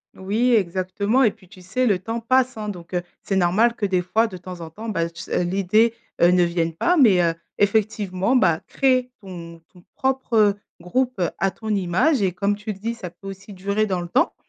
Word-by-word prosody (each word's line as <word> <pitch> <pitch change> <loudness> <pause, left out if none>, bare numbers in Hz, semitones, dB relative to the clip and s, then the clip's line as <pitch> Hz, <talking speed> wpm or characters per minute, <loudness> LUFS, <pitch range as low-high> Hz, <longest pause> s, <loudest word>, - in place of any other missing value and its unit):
Oui, 220 +6 +1
exactement 200 +5 +1
et 215 - +4
puis, 185 - -21
tu 185 - -15
sais, 245 +7 0
le 200 -4 +3
temps 225 +5 -4
passe, 255 +2 +2
hein. 210 -1 -4
Donc, 175 -2 -9
heu, 180 - 0 0.2
c'est 195 - -2
normal 190 +6 +3
que, 210 - -2
des 185 -2 +1
fois, 220 +6 +2
de 185 -4 -8
temps 180 -1 -9
en 160 - -7
temps, 220 +7 -8
bah, 170 -5 -1
tu 170 0 -10
sais, - - -1
heu, - - +1
l'idée, 200 +5 +2 0.3
heu, 170 - +7
ne 180 -1 +4
vienne 170 -1 0
pas 350 - +2
mais, 205 -10 +6
heu, 165 -1 +2 0.2
effectivement, 205 +1 +1
bah, 170 -9 +3
créer 255 -2 +1
ton 170 -3 -9
ton 180 -1 -18
propre, 265 -2 -2
heu, 205 -2 +5 0.2
groupe 245 +6 -1 0.2
à 195 - +2
ton 220 +3 -8
image 200 - +2
et 190 -2 +2
comme 200 +3 0
tu 210 +1 -5
le 195 - -15
dis, 230 +3 -3
ça 180 -6 -7
peut 180 +3 -14
aussi 195 +1 -9
durer 200 +3 0
dans 185 -2 -1
le 175 - -6
temps - - +2
195 Hz, 230 wpm, -22 LUFS, 180-225 Hz, 0.3 s, heu